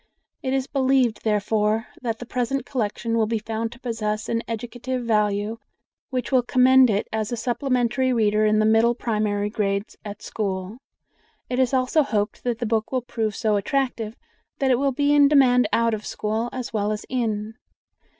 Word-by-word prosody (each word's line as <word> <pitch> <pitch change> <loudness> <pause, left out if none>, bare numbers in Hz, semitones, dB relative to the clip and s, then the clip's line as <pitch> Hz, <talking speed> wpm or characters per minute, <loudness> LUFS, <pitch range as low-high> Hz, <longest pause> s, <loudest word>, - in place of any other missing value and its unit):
It 260 - -2
is 265 -1 0
believed, 265 -4 +1
therefore, 215 +1 +1 0.2
that 230 -3 -2
the 245 - -8
present 250 +2 -2
collection 230 -1 -2
will 225 -2 +2
be 225 +1 0
found 225 +1 -3
to 240 - -13
possess 220 -3 -3
an 230 0 0
educative 245 +2 -4
value 210 0 0 0.5
which 255 0 -3
will 260 -2 +5
commend 255 +1 +5
it 205 -1 0
as 220 0 -2
a 240 - -2
supplementary 250 +1 0
reader 215 -3 +2
in 215 0 +3
the 215 - +3
middle 225 +2 +4
primary 210 -3 -1
grades 200 -1 -2
at 205 -1 -8
school. 195 +1 -4 0.7
It 250 - 0
is 255 -2 +3
also 260 +4 +2
hoped 215 -7 -2
that 240 -2 -1
the 240 - -3
book 220 -1 -1
will 255 -2 -1
prove 220 -4 -2
so 215 -2 +1
attractive 230 0 -1 0.4
that 270 -2 +1
it 250 - +3
will 275 0 +2
be 285 +2 +2
in 290 -1 +6
demand 250 -5 +4
out 230 0 +2
of 215 -1 -3
school 220 +3 -2
as 255 -2 -6
well 210 -1 0
as 210 0 -4
in. 220 -4 -2
230 Hz, 180 wpm, -23 LUFS, 215-255 Hz, 0.7 s, in